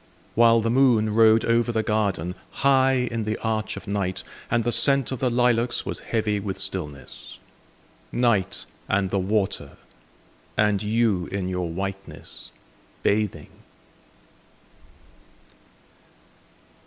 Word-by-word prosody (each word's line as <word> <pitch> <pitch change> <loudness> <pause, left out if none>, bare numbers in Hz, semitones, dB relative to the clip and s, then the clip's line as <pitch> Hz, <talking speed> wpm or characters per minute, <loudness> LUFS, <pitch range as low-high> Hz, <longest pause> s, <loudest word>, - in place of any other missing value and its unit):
While 115 0 +5
the 115 +1 0
moon 120 -5 +3
rode 110 0 +5
over 115 +1 +2
the 110 -1 0
garden, 100 -5 0 0.3
High 130 -2 +4
in 115 -1 -2
the 110 +1 -2
arch 110 -1 -1
of - - -9
night, 100 -3 -2 0.3
And 120 0 +1
the 120 - 0
scent 135 0 +3
of 130 - -3
the 130 -1 +1
lilacs 120 0 +2
was - - -3
heavy 110 -2 -1
with 95 -1 -4
stillness. 75 -7 -5 0.7
Night, 105 -6 +1 0.2
and 95 -1 +1
the 100 - +1
water, 95 +1 -1 0.8
and 105 -2 +2
you 105 -4 +1
in 95 -2 -3
your 90 -2 -2
whiteness, 95 +3 -6 0.5
bathing! 105 -1 0
110 Hz, 115 wpm, -24 LUFS, 95-120 Hz, 0.8 s, While